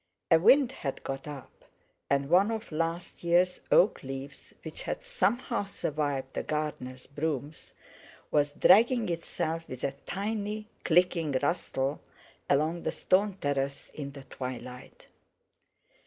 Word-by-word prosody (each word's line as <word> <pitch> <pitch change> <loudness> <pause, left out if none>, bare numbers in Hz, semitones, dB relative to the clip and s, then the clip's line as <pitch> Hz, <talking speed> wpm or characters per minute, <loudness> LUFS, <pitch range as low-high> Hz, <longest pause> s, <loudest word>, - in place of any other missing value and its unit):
A 165 - +8
wind 255 - +6
had 140 - -5
got 135 +2 -5
up, 145 -3 -8 0.6
and 140 0 +2
one 185 +6 +5
of 225 -3 -4
last 165 +3 -3
year's 175 +1 +3
oak 195 - +5
leaves 135 +1 -8
which - - -7
had - - -4
somehow 245 - 0
survived 145 -7 -2
the - - -1
gardener's 130 -4 -4
brooms, 145 0 -4 0.6
was 145 -1 +3
dragging 225 - +5
itself 165 -1 -3
with 130 - -7
a 140 - 0
tiny 210 +2 -3 0.2
clicking 170 -3 +3
rustle 145 -5 -1 0.5
along 155 +4 +2
the - - -1
stone 195 +1 +2
terrace 140 -3 -2
in 140 -2 -6
the 140 -1 -10
twilight. 125 -1 -8
160 Hz, 125 wpm, -29 LUFS, 140-195 Hz, 0.6 s, A